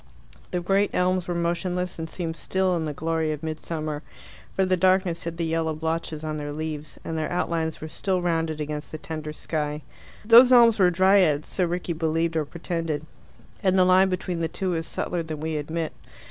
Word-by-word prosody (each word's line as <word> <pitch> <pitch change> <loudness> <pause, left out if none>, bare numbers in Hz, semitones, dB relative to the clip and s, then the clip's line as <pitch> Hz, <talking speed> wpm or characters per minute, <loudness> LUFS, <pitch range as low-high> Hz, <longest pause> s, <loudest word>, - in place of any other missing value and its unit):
The 180 - -2
great 195 +3 +2
elms 180 0 +1
were 175 - -2
motionless, 175 +1 -1
and 160 0 -4
seemed 165 -2 -4
still 190 +1 0
in 165 -2 -1
the 150 - -2
glory 160 +1 -1
of 150 +1 -5
midsummer, 155 -1 -4 0.5
for 190 - +1
the 185 0 +2
darkness 185 -1 +2
hid 165 0 -5
the 170 - -1
yellow 160 -1 0
blotches 160 0 -3
on 155 -1 -3
their 145 -1 -4
leaves, 155 0 -5
and 165 - -3
their 155 -1 -2
outlines 165 -2 -1
were 155 - -5
still 185 +3 -1
rounded 165 -3 -1
against 150 0 -4
the 155 - -5
tender 155 -1 -6
sky. 150 -1 -3 0.4
Those 235 +3 +8
elms 235 -3 +7
were 185 -2 +6
Dryads 180 -4 +4
so 185 - +1
Rickie 175 0 -2
believed 165 +1 0
or 155 -2 +1
pretended, 165 -1 -3 0.6
and 190 -1 +3
the 185 - +6
line 185 +1 +5
between 180 -1 -2
the 165 - 0
two 185 +3 -2
is 165 0 -2
subtler 175 - -2
than 160 -2 -6
we 160 +1 -3
admit. 155 +2 -3
165 Hz, 195 wpm, -25 LUFS, 155-180 Hz, 0.6 s, Those